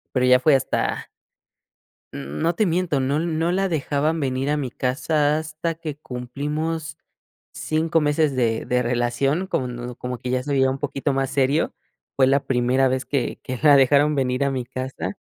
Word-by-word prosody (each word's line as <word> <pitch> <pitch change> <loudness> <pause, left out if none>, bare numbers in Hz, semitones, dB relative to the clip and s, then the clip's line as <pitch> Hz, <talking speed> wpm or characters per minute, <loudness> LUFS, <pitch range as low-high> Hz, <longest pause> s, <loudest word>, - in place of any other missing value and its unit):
pero 125 -1 +3
ya 125 0 +6
fue 140 +2 +4
hasta 135 - -1 1.0
mm, 70 +1 -6
no 170 +1 +1
te 215 - +2
miento, 175 -5 0
no 140 +3 0
no 165 0 0
la 195 +1 0
dejaban 155 +1 0
venir 135 0 -1
a 150 - +1
mi 130 -4 -3
casa 145 +3 0
hasta 155 0 -4 0.2
hasta - - -6
que 155 -3 -5
cumplimos 150 +5 -4 0.6
5 160 +1 0
meses 150 -1 +1
de 115 -3 0
de 125 0 +1
relación, 125 +8 0
como 130 - -1
no 120 0 -6
como 125 -1 -5
que 125 - -5
ya 130 0 0
se 145 - -3
veía 130 -1 +3
un 135 - -3
poquito 140 0 -2
más 135 0 -1
serio. 140 +3 +1 0.4
Fue 130 - +4
la 135 +1 +2
primera 130 +1 +2
vez 130 0 -1
que 135 -4 -2
que 130 -1 -5
la 145 -2 +7
dejaron 145 +3 +4
venir 130 0 0
a 140 - +1
mi 130 -2 -2
casa. 130 +1 -5
140 Hz, 190 wpm, -23 LUFS, 125-155 Hz, 1.0 s, la